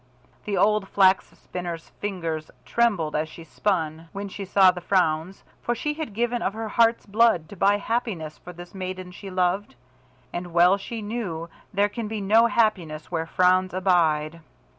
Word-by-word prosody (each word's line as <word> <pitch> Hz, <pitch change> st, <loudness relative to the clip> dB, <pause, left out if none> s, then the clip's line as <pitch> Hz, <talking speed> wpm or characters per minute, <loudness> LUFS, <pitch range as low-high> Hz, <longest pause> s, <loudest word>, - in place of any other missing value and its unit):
The 200 Hz, -2 st, -1 dB
old 210 Hz, -1 st, +3 dB
Flax 190 Hz, -1 st, +4 dB
spinner's 175 Hz, -2 st, -7 dB
fingers 165 Hz, -6 st, -3 dB, 0.2 s
trembled 205 Hz, -10 st, +1 dB
as 155 Hz, +1 st, -1 dB
she 165 Hz, -, -11 dB
spun, 165 Hz, -2 st, -2 dB
when 200 Hz, 0 st, -5 dB
she 195 Hz, +1 st, -6 dB
saw 190 Hz, 0 st, +6 dB
the 180 Hz, -1 st, -8 dB
frowns, 180 Hz, -1 st, 0 dB, 0.2 s
for 240 Hz, -, -1 dB
she 300 Hz, +5 st, -2 dB
had 300 Hz, -9 st, -6 dB
given 240 Hz, +1 st, 0 dB
of 195 Hz, -, -1 dB
her 220 Hz, 0 st, -4 dB
heart's 230 Hz, +1 st, +3 dB
blood 210 Hz, -6 st, +3 dB
to -, -, -9 dB
buy 200 Hz, +2 st, +3 dB
happiness 205 Hz, -9 st, -3 dB
for 180 Hz, -, -10 dB
this 175 Hz, 0 st, -11 dB
maiden 185 Hz, -1 st, -5 dB
she 195 Hz, +2 st, -9 dB
loved, 185 Hz, -1 st, 0 dB, 0.6 s
and 175 Hz, -1 st, -5 dB
well 175 Hz, +3 st, +5 dB
she 220 Hz, +2 st, -6 dB
knew 195 Hz, -7 st, -4 dB, 0.2 s
there 200 Hz, 0 st, +2 dB
can 220 Hz, +1 st, -5 dB
be 215 Hz, 0 st, -4 dB
no 220 Hz, +4 st, +5 dB
happiness 190 Hz, -10 st, 0 dB
where 165 Hz, -2 st, -2 dB
frowns 185 Hz, +1 st, +3 dB
abide. 165 Hz, -4 st, +2 dB
190 Hz, 170 wpm, -25 LUFS, 170-210 Hz, 0.6 s, saw